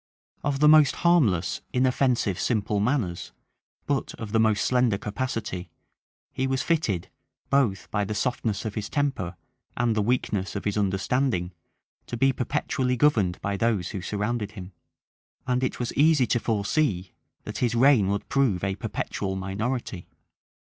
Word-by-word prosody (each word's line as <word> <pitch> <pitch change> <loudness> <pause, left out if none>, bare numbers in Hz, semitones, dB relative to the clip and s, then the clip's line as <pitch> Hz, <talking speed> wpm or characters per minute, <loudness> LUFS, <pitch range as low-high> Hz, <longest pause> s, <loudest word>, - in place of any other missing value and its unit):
Of 140 0 -1
the 150 - +6
most 155 -2 +6
harmless, 135 - +3
inoffensive, 125 -6 +1
simple 105 -3 0
manners, 105 -6 -1 0.5
but 140 -2 -2
of 110 -2 -7
the 110 - +2
most 110 -2 +2
slender 125 -5 +2
capacity, 105 -5 -4 0.6
he 130 - -1
was 130 0 0
fitted, 130 - 0 0.4
both 125 -9 +2
by 105 -1 0
the 105 +1 -3
softness 110 -2 -1
of 110 - -3
his 105 -1 -4
temper 135 - -1 0.4
and 120 -2 +1
the 110 - +2
weakness 105 -4 -1
of 100 - -4
his 105 - 0
understanding, 100 -1 0 0.5
to 120 - -4
be 135 +2 +3
perpetually 125 -1 -1
governed 110 -10 +2
by 100 0 -2
those 105 -5 0
who 95 - -5
surrounded 105 +2 -2
him; 95 -2 -9 0.7
and 125 0 0
it 130 - -2
was 120 - -2
easy 150 -2 +4
to 120 - +1
foresee 105 - 0 0.3
that - - -6
his 120 -2 +1
reign 125 -5 +5
would 100 +1 -2
prove 125 -10 +1
a 95 0 0
perpetual 100 -2 -3
minority. 95 +1 -3
110 Hz, 150 wpm, -26 LUFS, 100-130 Hz, 0.7 s, the